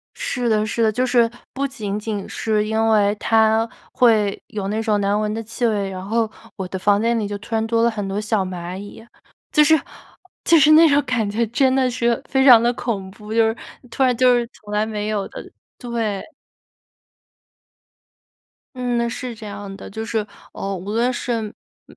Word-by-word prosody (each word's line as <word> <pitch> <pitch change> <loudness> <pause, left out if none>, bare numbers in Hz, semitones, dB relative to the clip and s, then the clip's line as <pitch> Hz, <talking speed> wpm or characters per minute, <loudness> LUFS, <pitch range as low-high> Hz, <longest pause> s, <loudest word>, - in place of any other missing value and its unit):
是 245 -1 -2
的 215 -1 +2
是 230 +1 -1
的。 220 - +4
就 250 +3 0
是 235 -2 +3 0.2
不 275 +1 -1
仅 210 -6 -4
仅 210 -2 -4
是 215 -2 -1
因 220 +1 +1
为 205 -2 +3
它 220 +1 +2 0.2
会 215 -5 +3
有 205 -3 -4
那 220 +2 -1
种 215 -2 +1
难 200 +1 +1
闻 210 0 -1
的 225 +1 -3
气 230 +2 -2
味， 205 -3 0
然 185 0 -6
后 225 +1 0 0.3
我 190 -2 -4
的 190 - -4
房 200 +2 +2
间 230 +1 +1
里 210 - -1
就 205 0 -4
突 225 +3 -7
然 220 - +1
多 230 0 +1
了 235 - +4
很 210 -3 -4
多 195 +2 -2
小 215 -2 0
蚂 180 -1 -6
蚁。 205 +3 -10 0.5
就 300 - +5
是 315 +1 +5 0.7
就 335 -1 +6
是 300 +2 +6
那 325 +1 +8
种 285 0 +3
感 250 -6 -1
觉 225 +3 0
真 260 +2 +2
的 260 -1 +2
是 235 -1 0
非 265 0 +2
常 240 -4 +8
地 240 +1 +2
恐 200 -7 -4
怖， 210 +1 -10
就 225 0 +4
是 225 - -2 0.3
突 270 - -2
然 250 -2 +3
就 250 0 +5
是 240 -1 +1
从 210 0 -13
来 210 +1 +1
没 210 -1 -3
有 205 -2 -1
的 - - -8 0.4
对。 225 -5 -3 2.5
嗯， 240 -2 -1
是 245 0 -5
这 215 -1 -10
样 200 -1 -7
的。 - - -10
就 220 +2 -5
是， 220 -2 -2 0.3
呃， 195 0 -4
无 185 +3 -7
论 235 +4 +1
是， 240 -1 -2 0.5
嗯， - - -18
220 Hz, 215 characters per minute, -21 LUFS, 205-240 Hz, 2.5 s, 那